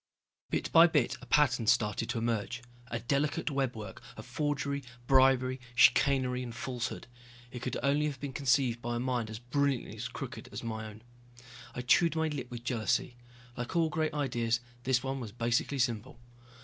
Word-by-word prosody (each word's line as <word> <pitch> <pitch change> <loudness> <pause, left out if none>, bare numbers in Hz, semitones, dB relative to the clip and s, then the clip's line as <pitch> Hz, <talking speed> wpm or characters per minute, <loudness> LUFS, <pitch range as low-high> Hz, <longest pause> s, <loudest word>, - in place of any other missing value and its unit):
Bit - - -2
by 165 +1 +8
bit 145 -7 +1
a - - -12
pattern 125 -6 +3
started 110 -1 +2
to - - -1
emerge. 115 +1 -2 0.2
A 120 -1 -4
delicate 145 +6 0
webwork 120 -8 -3 0.2
of 110 - -8
forgery, 140 +1 -2 0.2
bribery, 130 -1 +4 0.2
chicanery 130 -1 +4
and 120 -2 -6
falsehood. 125 -1 -4 0.5
It 125 - -7
could 125 - -2
only 145 +2 +2
have 140 -3 -5
been 140 -1 -5
conceived 125 -3 +2
by 120 0 -2
a - - -1
mind 120 -3 -1
as 110 - -6
brilliantly 125 -2 -1
crooked 130 -1 -7
as - - -6
my 110 -1 -4
own. 110 +1 -12 0.7
I 125 - -3
chewed 165 +6 +4
my 160 0 +1
lip 140 -5 -5
with 120 -1 -7
jealousy. 120 0 0 0.4
Like 120 +5 -5
all 165 -1 +3
great 155 0 -1
ideas, 120 -5 0 0.3
this 130 -1 +2
one 135 0 -2
was 115 -5 -6
basically 120 +4 0
simple. 120 -1 -1
125 Hz, 170 wpm, -31 LUFS, 120-140 Hz, 0.7 s, by